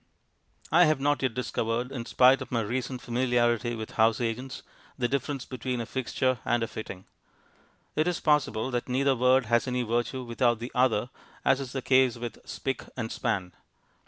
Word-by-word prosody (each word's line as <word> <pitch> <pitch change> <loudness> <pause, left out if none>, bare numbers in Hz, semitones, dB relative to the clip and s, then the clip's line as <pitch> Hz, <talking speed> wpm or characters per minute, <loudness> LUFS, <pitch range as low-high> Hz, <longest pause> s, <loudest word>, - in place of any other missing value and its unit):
I 175 +3 +7
have 155 -3 +2
not 145 +1 +1
yet 130 -4 0
discovered, 120 0 -2
in 120 -4 -5
spite 130 +1 +5
of - - -7
my 120 -2 +1
recent 125 +3 -3
familiarity 120 -1 +1
with 110 -1 -6
house 110 0 +4
agents, 125 +2 -3 0.3
the 125 - +1
difference 140 0 -2
between 125 -1 -4
a 115 - -3
fixture 130 +1 -1
and 120 0 +1
a - - -1
fitting. 100 -4 -8 0.9
It 155 +3 +2
is 175 -1 0
possible 135 -6 +1
that 120 +1 -2
neither 135 +2 +2
word 125 +1 +4
has 120 +3 +2
any 125 -1 0
virtue 120 +3 -1
without 120 0 +1
the 120 +3 -7
other, 125 -2 +2 0.3
as 135 0 +4
is 130 -2 -6
the 135 -2 -3
case 130 -2 +4
with 120 0 -6
"spick" 135 -1 -3 0.2
and 115 -3 -3
"span." 90 -2 -2
125 Hz, 180 wpm, -28 LUFS, 115-130 Hz, 0.9 s, I